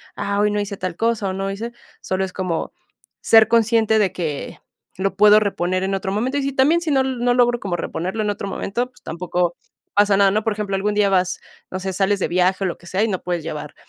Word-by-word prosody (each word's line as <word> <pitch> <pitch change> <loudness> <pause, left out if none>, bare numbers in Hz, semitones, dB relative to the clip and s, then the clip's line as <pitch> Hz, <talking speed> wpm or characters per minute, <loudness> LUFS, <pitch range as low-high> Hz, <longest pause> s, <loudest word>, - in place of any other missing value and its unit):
"Ah, 200 0 -2
hoy 210 0 +3
no 210 - 0
hice 200 -1 -4
tal 185 -3 -4
cosa, 225 -3 0
o - - -3
no 195 +1 -3
hice", 230 +4 -5 0.3
solo 190 0 -1
es 185 - -9
como 180 -4 -3 0.5
ser 220 -1 +6
consciente 225 -1 +3
de 195 -3 +2
que 160 -6 -4 0.4
lo 195 0 -1
puedo 210 +1 +7
reponer 185 -3 -1
en 195 0 0
otro 190 0 -3
momento. 250 +7 -1
Y 280 - 0
si 275 -1 -2
también, 300 +6 +3
si 320 -3 -2
no 265 -1 +3
no 245 -2 0
logro 240 -1 +3
como 190 -3 -3
reponerlo 185 +5 -3
en 210 - -1
otro 200 -1 -3
momento, 235 +5 -2
pues, 250 - -23
tampoco 175 +1 -2 0.4
pasa 205 -1 +4
nada, 200 -1 +5
¿no? 215 +1 0
Por 220 - 0
ejemplo, 205 -2 -3
algún 205 +2 0
día 205 -1 +3
vas, 185 -1 +1 0.3
no 185 - -3
sé, 190 0 -4
sales 200 +2 +1
de - - 0
viaje, 185 +2 +1
o 190 - +1
lo 175 - -4
que 175 - -16
sea, 195 +4 0
y - - +2
no 190 -4 -2
puedes 175 -3 -3
llevar 150 -1 -6
200 Hz, 245 wpm, -21 LUFS, 185-220 Hz, 0.5 s, puedo